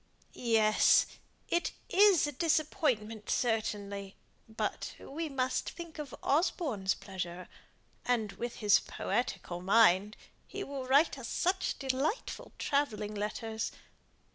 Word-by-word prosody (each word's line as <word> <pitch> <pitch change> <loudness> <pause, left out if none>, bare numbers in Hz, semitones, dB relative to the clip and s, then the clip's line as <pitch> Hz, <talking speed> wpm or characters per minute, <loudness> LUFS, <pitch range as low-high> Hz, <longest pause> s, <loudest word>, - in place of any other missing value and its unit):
"Yes! 220 -3 +4 0.4
it 345 - 0
is 395 -5 +5
a 295 - -2
disappointment 255 -8 0
certainly, 205 -4 -1 0.3
but 220 - -3
we 315 +3 -5
must 260 -2 -1
think 335 -2 -9
of 290 -3 -6
Osborne's 275 - +1
pleasure. 180 -2 -6 0.6
And 225 -4 0
with 240 +3 -5
his 205 -2 +4
poetical 195 -5 -3
mind, 205 +1 +4 0.3
he 400 0 -5
will 275 -4 -6
write 280 +2 +4
us 240 - -6
such 370 +1 0
delightful 280 - -2
travelling 225 -7 -1
letters. 220 +2 -3
240 Hz, 110 wpm, -32 LUFS, 210-295 Hz, 0.6 s, is